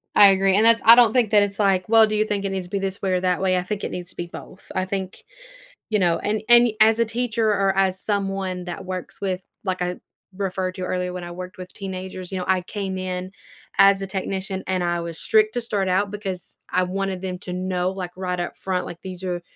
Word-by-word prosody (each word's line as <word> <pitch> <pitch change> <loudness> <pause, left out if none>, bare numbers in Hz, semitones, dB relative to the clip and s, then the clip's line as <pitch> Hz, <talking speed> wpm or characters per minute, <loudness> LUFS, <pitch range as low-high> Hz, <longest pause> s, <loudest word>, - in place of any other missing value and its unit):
I 205 - +9
agree. 195 0 +3
And 215 +2 +4
that's 230 0 +5
I 230 - +10
don't 235 -2 +6
think 240 -5 +2
that 205 -2 +6
it's 200 0 -4
like, 195 -2 +2
"Well, 225 -1 +7
do 215 - -1
you 215 0 +2
think 205 -2 -2
it 195 - -1
needs 190 -2 -3
to - - -21
be 200 - 0
this 195 0 -4
way 190 -2 0
or 180 - +2
that 180 0 +1
way?" 185 -1 +2
I 180 - -1
think 205 +2 -4
it - - -3
needs 180 0 -6
to - - -17
be 175 - -5
both. 180 - -12
I 185 - 0
think 190 0 -5 0.7
you 215 - +2
know? 175 -3 +2
And 210 0 -1
and 240 0 +7
as 220 +1 +6
a - - +5
teacher 230 -1 -1
or 195 -2 +1
as 190 -1 +2
someone 195 -3 -2
that 180 +2 -6
works 185 -1 -6
with 190 -2 -2 0.2
like 185 -2 -1
I 180 0 -2 0.4
referred 185 -2 -2
to 185 - -5
earlier 180 0 -2
when 180 -1 -6
I 175 - -7
worked 185 +2 -8
with 180 0 -9
teenagers, 185 -2 -6
you 190 - -3
know, 180 - -3
I 190 -1 +2
came 190 -1 -4
in 185 0 -4 0.5
as 195 0 +6
a 195 - -3
technician, 190 0 -4
and 185 -1 0
I 175 0 0
was 170 -1 -6
strict 215 -1 +3
to 245 - 0
start 205 -5 -1
out 195 +2 +1
because 190 -4 -6
I 185 +1 +2
wanted 190 0 -3
them 185 -1 -4
to 180 - -6
know, 180 0 -1
like, 185 -2 -5
right 180 -1 -3
up 175 - -4
front, 185 -1 -2
like, 170 - -8
"These 185 -1 -8
are 175 -1 -3
190 Hz, 255 wpm, -23 LUFS, 180-200 Hz, 0.7 s, I